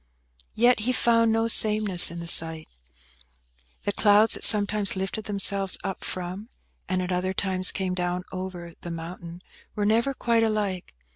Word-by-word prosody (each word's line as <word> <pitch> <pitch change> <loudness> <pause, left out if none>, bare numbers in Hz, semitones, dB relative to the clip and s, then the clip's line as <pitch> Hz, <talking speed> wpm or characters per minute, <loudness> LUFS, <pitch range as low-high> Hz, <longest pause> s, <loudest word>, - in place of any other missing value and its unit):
Yet 240 +2 +3
he 230 +4 -2
found 230 -2 +2
no 225 +1 0
sameness 215 -5 +4
in 170 +1 -8
the 170 - -8
sight. 160 -1 +1 1.2
The 205 - -2
clouds 210 +2 +3
that - - -2
sometimes 205 -1 +4
lifted 195 +3 -5
themselves 200 -1 +1
up 190 - -6
from, 185 +5 -6 0.4
and 185 -1 -1
at 180 - -5
other 185 +1 -2
times 185 -1 +2
came 190 -1 -4
down 180 0 -3
over, 185 -2 -8
the 175 - -8
mountain, 170 +1 -9 0.3
were 205 - -2
never 235 +6 0
quite 235 -2 0
alike. 205 - -3
195 Hz, 155 wpm, -24 LUFS, 180-215 Hz, 1.2 s, sameness